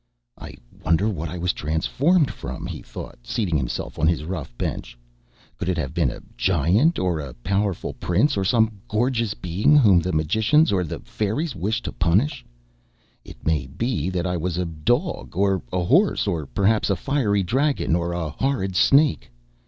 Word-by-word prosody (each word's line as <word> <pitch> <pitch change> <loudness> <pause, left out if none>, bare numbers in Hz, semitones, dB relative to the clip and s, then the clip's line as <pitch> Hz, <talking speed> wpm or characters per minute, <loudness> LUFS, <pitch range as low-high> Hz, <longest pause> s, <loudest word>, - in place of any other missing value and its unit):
"I - - -10 0.3
wonder 85 +7 +2
what 85 -7 -3
I 90 - -6
was 90 0 0
transformed 135 - +1
from?" - - -7
he - - -6
thought, - - -9
seating 85 - -2
himself 60 -3 -3
on 80 - +3
his 80 -2 +1
rough 80 -6 -5
bench. - - -4 0.6
"Could 90 - -2
it 90 - 0
have 70 -5 -3
been 80 -7 +1
a - - -8
giant, 95 - +2
or 90 -3 0
a 70 -4 -7
powerful 95 +8 -2
prince, 110 - +1
or 95 - 0
some 110 0 +2
gorgeous 115 -1 0
being 90 - +2
whom 105 -10 +6
the 90 +2 -2
magicians 110 - +3
or 95 -2 +1
the 80 - -6
fairies 115 +8 -2
wished 100 +5 -2
to - - -3
punish? 105 - +1 0.8
It - - -14
may 75 -5 0
be 90 - -2
that 90 -1 -2
I 90 -1 -1
was 85 +1 -2
a 90 - 0
dog 105 - -1
or 95 -1 +2
a 90 -1 0
horse, 175 - +3
or 85 -8 -2
perhaps 105 +8 +1
a 100 - +2
fiery 105 -3 0
dragon 135 - +1
or 85 0 -1
a 85 -3 -3
horrid 95 - -1
snake. 145 +9 +3
95 Hz, 175 wpm, -23 LUFS, 80-115 Hz, 0.8 s, whom